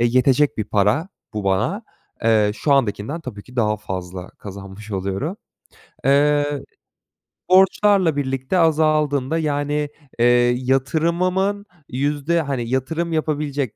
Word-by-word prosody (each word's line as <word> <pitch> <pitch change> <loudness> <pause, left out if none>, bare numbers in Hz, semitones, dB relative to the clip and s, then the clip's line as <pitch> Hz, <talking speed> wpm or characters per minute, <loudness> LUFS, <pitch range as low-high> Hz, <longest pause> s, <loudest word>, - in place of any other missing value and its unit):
e, 120 - +3
yetecek 130 +3 +3
bir 110 - 0
para 105 - +1 0.3
bu 105 -2 -3
bana. 110 - 0 0.4
Eee, 110 -2 +4
şu 140 +6 0
andakinden 135 +4 0
tabii 110 -9 -8
ki 125 0 -16
daha 105 -2 +2
fazla 95 -3 -6
kazanmış 100 +1 -10
oluyorum. 100 - -3 0.7
Eee, 145 0 +2 0.9
borçlarla 190 -3 +4
birlikte 135 +4 -1
azaldığında, 155 -3 +2
yani, 145 -1 -1 0.3
eee, 120 - +4 0.3
yatırımımın 170 +10 0 0.2
yüzde, 145 +5 0
hani, 130 -5 -3
yatırım 160 +6 -1
yapabilecek 145 -5 -1
140 Hz, 115 wpm, -21 LUFS, 110-155 Hz, 0.9 s, Eee